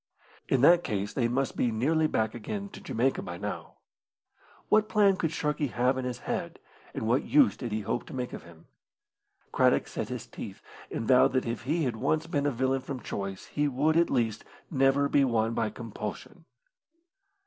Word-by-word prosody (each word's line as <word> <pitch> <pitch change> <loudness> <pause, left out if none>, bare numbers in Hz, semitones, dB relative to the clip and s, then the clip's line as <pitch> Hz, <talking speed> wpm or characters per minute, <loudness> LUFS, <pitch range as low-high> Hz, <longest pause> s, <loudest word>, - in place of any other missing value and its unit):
In 130 - +3
that 175 +5 +6
case 105 -4 -2
they 120 -3 +1
must 130 +3 -1
be 120 - +1
nearly 155 +8 +2
back 110 -6 0
again 200 - -5
to - - -11
Jamaica 130 +4 0
by 85 - -6
now. - - -5 0.9
What 215 0 +3
plan 205 -3 +4
could 165 -4 -1
Sharkey 150 -2 -1
have 125 +1 +1
in 130 -1 -3
his 125 -1 -4
head, - - -3 0.4
and 110 - -2
what 125 +5 +3
use 290 -3 +4
did 120 -3 -5
he 110 +1 -1
hope 105 - -3
to - - -9
make 125 -1 -4
of - - -6
him? 85 -1 -16 0.9
Craddock - - +3
set - - -4
his - - -5
teeth, - - -9 0.3
and 115 - -4
vowed 125 -1 +5
that 130 - +1
if 115 0 -4
he 160 +4 +1
had 120 -5 -1
once 155 +7 0
been 145 -3 0
a - - +2
villain 130 +1 0
from 130 0 -5
choice 100 -1 -5
he 145 0 -1
would, 145 +4 +1
at 170 +1 +4
least, 115 -4 0 0.3
never 135 0 +3
be 140 0 +3
one 115 -3 +1
by 115 -1 0
compulsion. 115 0 -7
130 Hz, 190 wpm, -28 LUFS, 115-150 Hz, 0.9 s, that